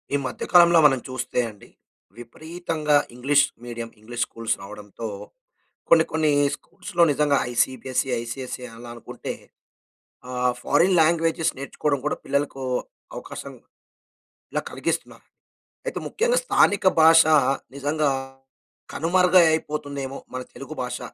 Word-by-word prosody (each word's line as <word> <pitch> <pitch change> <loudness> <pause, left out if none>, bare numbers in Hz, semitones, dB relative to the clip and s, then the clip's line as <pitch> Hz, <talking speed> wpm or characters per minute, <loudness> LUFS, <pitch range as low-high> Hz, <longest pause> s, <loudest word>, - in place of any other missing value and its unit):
ఈ - - +4
మధ్య 130 - -5
కాలంలో 170 -1 +7
మనం 135 -3 +5
చూస్తే 130 -1 -3
అండి. 105 -2 -15 0.5
విపరీతంగా 155 +4 -2 0.2
ఇంగ్లీష్ 140 +3 +3 0.2
మీడియం, 120 -1 -6
ఇంగ్లీష్ 115 +2 -3
స్కూల్స్ 115 -1 -2
రావడంతో, 105 +2 -8 0.8
కొన్ని, 160 -1 +6
కొన్ని 155 -1 +1 0.2
స్కూల్స్‌లో 175 -2 -3
నిజంగా 145 0 +2 0.2
ఐసీబీఎస్సీ 130 +2 0
ఐసీఎస్సీ, 125 +2 -6
అలా 120 +1 -11
అనుకుంటే 120 - -7 1.0
ఆ! - - -6 0.3
ఫారిన్ 175 +6 +3
లాంగ్వేజ‌స్ 165 0 +2
నేర్చుకోవడం 140 +1 -2
కూడా - - 0
పిల్లలకు 140 -1 -1 0.5
అవకాశం - - -8 1.0
ఇలా - - -1
కలిగిస్తున్నా, - - -3 0.7
అయితే - - -3
ముఖ్యంగా 480 +3 +1
స్థానిక 205 - +3 0.2
భాష 160 +1 +8 0.5
నిజంగా 145 +2 0 0.8
కనుమరుగై 180 +2 +4 0.2
అపోతుందేమో 140 -2 -5 0.2
మన 130 - -3
తెలుగు 145 +3 -9
భాష. 125 0 -4
145 Hz, 110 wpm, -24 LUFS, 125-165 Hz, 1.0 s, భాష